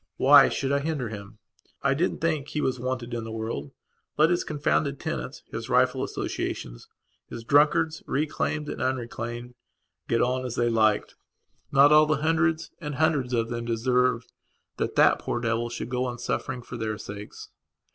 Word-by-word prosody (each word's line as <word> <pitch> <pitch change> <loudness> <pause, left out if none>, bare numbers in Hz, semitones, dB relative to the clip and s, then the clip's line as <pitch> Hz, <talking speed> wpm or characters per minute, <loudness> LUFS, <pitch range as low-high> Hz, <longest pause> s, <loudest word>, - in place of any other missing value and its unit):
Why 140 +1 +7
should 135 0 -2
I 140 - +2
hinder 145 -5 -2
him? 105 -1 -9 0.5
I 140 0 +3
didn't 165 +7 -1
think 155 -4 0
he 150 - -3
was 130 -3 -1
wanted 125 -1 -3
in 115 -1 -3
the 110 - -7
world, 110 -11 -4 0.5
let 155 +3 +5
his 175 - +1
confounded 145 -1 0
tenants, 65 -2 -5
his - - -6
rifle - - +3
associations, - - -4 0.4
his 115 - -8
drunkards, 150 +4 +3
reclaimed 150 +1 -1
and - - -5
unreclaimed, 120 -1 -3 0.5
get 115 - +1
on 130 +2 +1
as 125 -2 -4
they 120 -1 +1
liked. 110 -2 +2 0.6
Not 140 +2 +6
all 155 0 +7
the 155 -1 0
hundreds 160 0 +1
and 150 -3 -4
hundreds 145 -4 +1
of 115 -2 0
them 120 -1 -4
deserved 125 +1 +1 0.4
that - - -2
that - - +5
poor - - -2
devil 120 0 -1
should 120 -1 -5
go 125 0 -1
on 120 -1 -4
suffering 125 +1 -3
for 120 - -8
their 110 -2 -3
sakes. 105 +1 -9
125 Hz, 170 wpm, -26 LUFS, 115-145 Hz, 0.6 s, Why